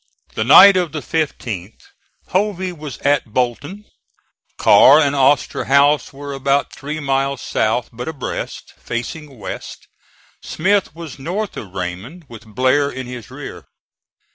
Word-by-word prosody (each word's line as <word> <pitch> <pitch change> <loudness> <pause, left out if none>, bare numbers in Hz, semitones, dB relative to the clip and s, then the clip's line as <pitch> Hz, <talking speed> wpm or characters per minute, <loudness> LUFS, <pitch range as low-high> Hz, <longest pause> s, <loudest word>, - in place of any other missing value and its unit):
The 110 - -1
night 185 - +8
of 175 -5 -1
the 155 - -3
15th 115 - -4 0.5
Hovey 190 -1 -1
was 150 -6 -8
at 140 -5 +1
Bolton; 145 - -2 0.7
Carr 140 - +7
and 145 -2 +2
Osterhaus 140 +1 +2
were 140 +1 -8
about 140 +1 0
three 150 +2 -6
miles 135 -1 -1
south, 115 +2 -1
but 120 +2 -7
abreast, 155 -5 -6
facing 135 +4 -6
west; 100 - -8 0.5
Smith 195 0 0
was 165 -5 -9
north 185 +9 -4
of 95 -4 -9
Raymond 95 - -6
with 115 -1 -12
Blair 130 +6 +1
in 130 -2 -6
his 125 -3 -9
rear. - - -9
140 Hz, 130 wpm, -19 LUFS, 125-155 Hz, 0.7 s, night